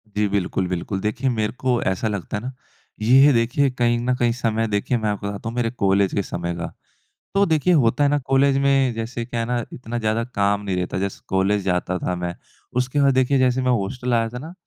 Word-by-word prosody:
जी 105 0 +2
बिल्कुल, 95 -1 -1
बिल्कुल। 90 +2 -3
देखिए 110 +6 -1
मेरे 110 -3 -1
को 125 -2 +1
ऐसा 95 +4 -2
लगता 105 -1 -3
है 105 - -7
ना 130 +1 -5 0.5
ये 135 +6 +6
देखिए 120 +4 +2
कहीं 120 -1 +1
न 125 +1 0
कहीं 120 -1 +1
समय 115 -2 -1
देखिए 105 +4 0
मैं 110 -2 -1
आप 105 - -3
बताता 100 +2 -4
हूँ 115 - -7
मेरे 120 -2 0
कॉलेज 100 -4 +1
के 100 - +1
समय 85 -1 -4
का। 85 - -5 0.6
तो 200 0 +4
देखिए 160 +1 +2
होता 140 -2 +3
है 140 - +4
ना 145 - +2
कॉलेज 135 0 +3
में 135 -2 +2
जैसे 115 +1 -4
क्या 120 0 -4
है 115 - -1
ना 120 0 -1
इतना 120 -1 -5
ज़्यादा 110 +1 0
काम 100 0 +2
नहीं 95 -2 -2
रहता। 90 0 -2
जैसे 100 0 -3
कॉलेज 95 +2 +1
जाता 90 -1 0
था 90 - -2
मैं 90 0 -4 0.4
उसके 130 +3 +1
बाद 140 -1 +4
देखिए 130 +1 +2
जैसे 130 0 +2
मैं 130 0 +1
हॉस्टल 120 +3 -1
आया 115 -1 +2
था 125 +2 -7
ना 160 +5 -9
115 Hz, 230 wpm, -22 LUFS, 100-130 Hz, 0.6 s, ये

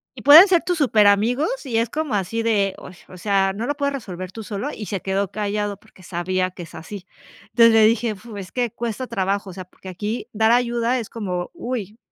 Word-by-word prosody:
Y 240 - -10
pueden 305 - +10
ser 355 -3 +3
tus 355 -1 -1
superamigos, 245 - +2
y 240 -4 -1
es 230 0 0
como 300 -2 -3
así 205 +3 -1
de, 205 -4 +1
o - - -11
s 180 - -16
o 185 - -11
sea, 195 +1 +1
¿no 215 +4 -4
lo 290 - -1
puedes 280 -1 -1
resolver 185 -8 -6
tú 225 +3 -8
solo?, 210 +6 -4
y 210 - -7
se 195 -3 -4
quedó 195 0 -1
callado 205 0 -2
porque 185 - -21
sabía 185 +1 -2
que 180 -1 -9
es 165 - -13
así. 185 +3 -9 0.4
Entonces, 230 -1 +5
le 220 -1 +6
dije, 225 0 +2
fu, 210 +1 -11
es 190 -2 -8
que 245 -3 -1
cuesta 235 +1 -4
trabajo, 200 -2 -2
o - - -9
sea, 185 0 -8
porque 185 +1 -13
aquí 210 +6 -4
dar 220 +1 +2
ayuda 240 +1 +1
es 225 - -7
como, 180 -6 -4
uy, 235 - -5
215 Hz, 230 wpm, -22 LUFS, 195-240 Hz, 0.4 s, pueden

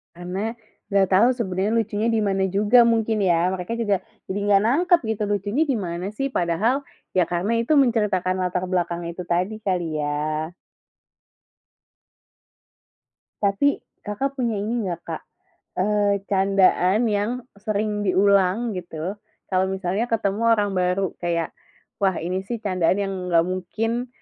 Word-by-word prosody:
Karena 185 +5 -3 0.4
enggak 195 -1 +4
tahu 215 +5 +6
sebenarnya 200 -4 -1
lucunya 220 0 -1
dimana 200 -4 +1
juga 210 +5 +5
mungkin 225 -2 +1
ya, 175 -1 +3
mereka 190 +4 -4
juga 200 -5 0 0.2
jadi 195 +2 -2
enggak 200 -1 +4
nangkep 345 +7 +4 0.2
gitu 210 - -3
lucunya 205 +7 0
dimana 185 - -2
sih 270 +6 -2
padahal 225 +5 0 0.3
ya 185 - +5
karena 175 +5 0
itu 310 - +1
menceritakan 210 -8 +2
latar 180 0 -1
belakangnya 170 -2 -2
itu 180 - -5
tadi 180 +5 -1
kali 175 -5 -1
ya. 155 +2 -2 2.9
Tapi 205 +8 +2 0.2
Kakak, 270 +7 -3
punya 235 -4 0
ini 225 +1 -2
enggak 175 -2 -4
Kak, 165 -1 -5 0.6
eee, 205 0 +2
candaan 195 0 +3
yang 205 +2 0 0.3
sering 210 0 -1
diulang 200 +3 +3
gitu 175 0 -5 0.4
kalau 185 0 +2
misalnya 190 +3 -1
ketemu 210 -2 0
orang 205 -2 +1
baru 180 +1 0
kayak, 170 -1 -1 0.5
wah 190 -3 +2
ini 180 +3 -2
sih 235 - -2
candaan 185 -3 +1
yang 195 -1 -2 0.2
nggak 165 -1 +4
mungkin 220 +7 -2
195 Hz, 135 wpm, -23 LUFS, 180-220 Hz, 2.9 s, tahu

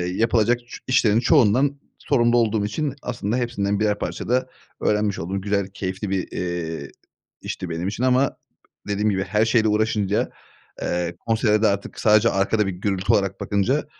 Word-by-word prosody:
yapılacak 115 +1 +2
çü - - -9
işlerin 115 -4 +3
çoğundan 135 +1 +3 0.2
sorumlu 120 -3 +2
olduğum 110 -3 +2
için 135 +7 -2
aslında 120 -1 -2
hepsinden 105 -5 -1
birer 105 -1 +1
parça - - -4
da 130 +1 +1 0.3
öğrenmiş 105 -1 +1
oldum. 95 +4 -3
Güzel 100 -1 0
keyifli 95 0 -5
bir, 95 -2 -1
eee, 80 -5 -4 0.5
işti 90 - -5
benim 85 +3 -3
için 110 +5 -3
ama 130 +1 +2 0.5
dediğim 105 +1 +1
gibi 95 -1 0
her 105 +3 +1
şeyle 110 -1 +3
uğraşınca, 105 -1 +1 0.5
eee, 85 0 -2
konsere 110 -1 +2
de - - +6
artık 100 -1 -2
sadece 110 +1 +5
arkada 105 +1 +1
bir 95 - -1
gürültü 95 +1 -1
olarak 100 -1 0
bakınca, 110 +9 0
105 Hz, 160 wpm, -23 LUFS, 95-115 Hz, 0.5 s, de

